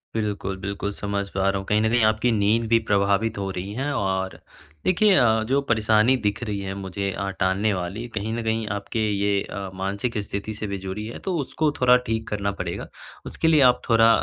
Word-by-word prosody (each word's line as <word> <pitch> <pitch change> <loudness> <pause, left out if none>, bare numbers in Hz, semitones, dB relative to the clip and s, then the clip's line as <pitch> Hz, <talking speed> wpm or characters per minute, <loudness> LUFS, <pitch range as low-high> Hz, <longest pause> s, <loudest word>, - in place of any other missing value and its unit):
बिल्कुल, 100 -3 -2
बिल्कुल, 100 +1 -3
समझ 100 0 -3
पा 95 0 +1
रहा 100 - 0
हूँ 95 - -5
कहीं 105 +2 +2
न 110 - +2
कहीं 120 -1 +3
आपकी 110 +3 +2
नींद 110 +1 +2
भी 115 - +6
प्रभावित 100 +2 +2
हो 100 -1 -2
रही 95 +2 -5
है 135 +5 -2
और 95 -2 -1 0.5
देखिए 200 +3 +4
अ, 110 -7 +4
जो 135 +2 +3
परेशानी 110 0 +3
दिख 105 +2 0
रही 105 -3 -3
है 95 0 -4
मुझे 100 0 -3
अ, 100 +1 -3
टालने 100 +3 +2
वाली 95 +6 -4
कहीं 110 +2 -2
न 115 - -3
कहीं 110 0 0
आपके 105 +3 -4
ये 100 0 +1
अ, 100 -2 -6
मानसिक 100 +5 -3
स्थिति 100 +1 -4
से 105 0 -5
भी 100 0 -3
जुड़ी 95 +3 -5
है 115 - -7
तो 185 - 0
उसको 150 +2 0
थोड़ा 125 -1 +6
ठीक 110 0 -2
करना 100 -1 -1
पड़ेगा, 100 - -5 0.4
उसके 160 - -1
लिए 155 -3 +5
आप - - +1
थोड़ा 115 0 +6
105 Hz, 210 wpm, -24 LUFS, 100-115 Hz, 0.5 s, भी